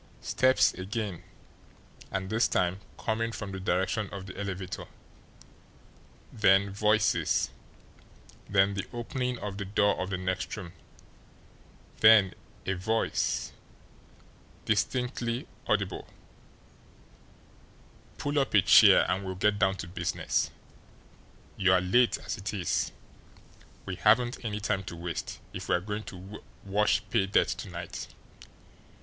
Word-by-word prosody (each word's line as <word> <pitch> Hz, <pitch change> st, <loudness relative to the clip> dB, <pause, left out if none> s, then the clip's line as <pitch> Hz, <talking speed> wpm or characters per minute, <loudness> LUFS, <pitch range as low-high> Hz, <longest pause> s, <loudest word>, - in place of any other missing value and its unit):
Steps 130 Hz, 0 st, +3 dB
again 100 Hz, -1 st, -4 dB, 0.9 s
and 95 Hz, 0 st, -3 dB
this 115 Hz, +2 st, +3 dB
time 90 Hz, +2 st, 0 dB, 0.2 s
coming 115 Hz, 0 st, -1 dB
from 105 Hz, -3 st, -6 dB
the 95 Hz, -, -5 dB
direction 95 Hz, +3 st, 0 dB
of 95 Hz, -1 st, -7 dB
the 95 Hz, -, -9 dB
elevator; 95 Hz, -2 st, -5 dB, 1.5 s
then 100 Hz, -2 st, +4 dB
voices; 105 Hz, +1 st, +2 dB, 1.0 s
then 100 Hz, 0 st, +3 dB
the 100 Hz, -1 st, -4 dB
opening 125 Hz, +1 st, -3 dB
of 100 Hz, -2 st, -6 dB
the 100 Hz, -, -3 dB
door 100 Hz, +1 st, +2 dB
of 95 Hz, -, -3 dB
the 95 Hz, -, -2 dB
next 95 Hz, +3 st, -3 dB
room; 90 Hz, -5 st, -8 dB, 1.3 s
then 110 Hz, -3 st, +7 dB, 0.3 s
a 95 Hz, -, 0 dB
voice, 110 Hz, +5 st, -1 dB, 1.1 s
distinctly 120 Hz, +3 st, -1 dB, 0.2 s
audible: 100 Hz, -3 st, -1 dB, 2.1 s
"Pull 145 Hz, 0 st, 0 dB
up 135 Hz, -5 st, 0 dB
a 100 Hz, -, +7 dB
chair, -, -, +8 dB
and 95 Hz, +2 st, -1 dB
we'll 95 Hz, -1 st, -4 dB
get 100 Hz, +2 st, +1 dB
down 95 Hz, -2 st, +3 dB
to 95 Hz, -, -6 dB
business. 90 Hz, +1 st, -1 dB, 1.1 s
You're 95 Hz, -1 st, +4 dB
late, 115 Hz, +7 st, +3 dB
as -, -, -5 dB
it 95 Hz, +2 st, -4 dB
is. 90 Hz, -3 st, 0 dB, 0.9 s
We 95 Hz, -2 st, -5 dB
haven't 120 Hz, +8 st, +3 dB
any 105 Hz, -2 st, -3 dB
time 100 Hz, -1 st, -1 dB
to 85 Hz, -, -7 dB
waste, 85 Hz, -1 st, -5 dB
if -, -, -7 dB
we're 90 Hz, -, +3 dB
going 105 Hz, +3 st, -5 dB
to 95 Hz, +2 st, -10 dB, 0.2 s
wash 105 Hz, +2 st, +2 dB
pay 100 Hz, -5 st, +2 dB
dirt 100 Hz, -, +3 dB
to -, -, -4 dB
night." -, -, -6 dB
100 Hz, 120 wpm, -29 LUFS, 95-110 Hz, 2.1 s, chair